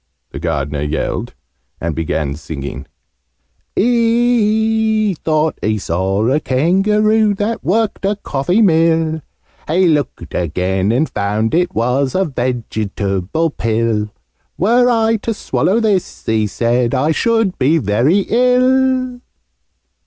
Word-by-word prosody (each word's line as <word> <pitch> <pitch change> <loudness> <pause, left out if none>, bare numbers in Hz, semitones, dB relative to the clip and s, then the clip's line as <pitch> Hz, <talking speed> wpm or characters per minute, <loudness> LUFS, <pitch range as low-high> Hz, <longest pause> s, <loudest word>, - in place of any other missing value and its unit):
the - - -7
Gardener 70 +1 -2
yelled, 75 +2 -3 0.4
and 85 0 -2
began 75 -2 -2
singing: 70 -2 -7 0.9
"He 220 -2 +2
thought 155 0 0
he 110 0 0
saw 95 +3 -1
a 135 +4 +2
Kangaroo 205 +9 +2
That 210 +3 -2
worked 215 +3 0
a 200 +2 +1
coffee 180 +3 0
mill: 160 -3 +2 0.5
He 180 +4 +2
looked 150 -5 -1
again, 90 +4 -1
and 135 +7 +1
found 105 +2 -1
it 175 +2 +1
was 125 +4 0
A 190 +1 +2
Vegetable 115 - -2
pill 110 -3 -1 0.5
'Were 240 +6 +3
I 225 -1 +2
to 225 +1 -3
swallow 205 +1 0
this,' 210 -5 -1
he 110 -1 +1
said, 120 +3 0
'I 150 +5 +1
should 225 +1 0
be 145 +5 +3
very 135 - +2
ill!'" 255 +1 +2
160 Hz, 115 wpm, -16 LUFS, -, 0.9 s, Were